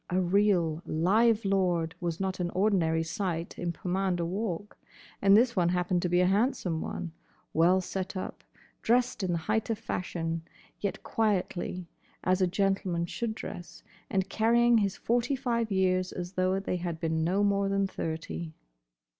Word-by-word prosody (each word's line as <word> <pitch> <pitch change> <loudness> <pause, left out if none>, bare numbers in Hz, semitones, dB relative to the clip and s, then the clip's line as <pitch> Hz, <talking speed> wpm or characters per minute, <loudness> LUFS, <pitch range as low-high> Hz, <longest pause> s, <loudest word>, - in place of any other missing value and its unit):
A 180 - +1
real, 180 -4 +2
live 215 +7 +2
lord 180 -4 +1
was 170 -2 -3
not 190 -1 -2
an 175 -1 -1
ordinary 180 -5 +2
sight 165 0 -3
in 175 -1 -1
Pomander 180 0 -1
Walk. 195 +1 -4 0.4
And 195 +1 +7
this 235 +1 +3
one 175 -3 +3
happened 180 0 +1
to 180 - 0
be 175 +1 +3
a - - +4
handsome 195 -4 +1
one; 170 - -4 0.4
well 180 +3 +4
set 190 +1 -4
up, 185 - -6 0.4
dressed 245 -1 +2
in 185 -2 0
the 170 - +1
height 220 +1 0
of 225 - 0
fashion, 165 -6 -3 0.4
yet 200 - -3
quietly, 185 -4 -1 0.4
as 185 +1 +2
a 185 - +4
gentleman 190 -2 0
should 220 +5 -3
dress; 175 -5 -8 0.3
and 190 -1 0
carrying 235 +2 +4
his 200 -1 0
forty 245 +3 +1
five 235 -4 -1
years 185 -1 +1
as 180 +1 -6
though 185 +1 +1
they 195 -2 -2
had 170 -2 -4
been 160 -1 0
no 190 +5 +2
more 200 -1 +2
than 195 0 +1
thirty. 160 -2 -5
185 Hz, 165 wpm, -29 LUFS, 175-205 Hz, 0.4 s, And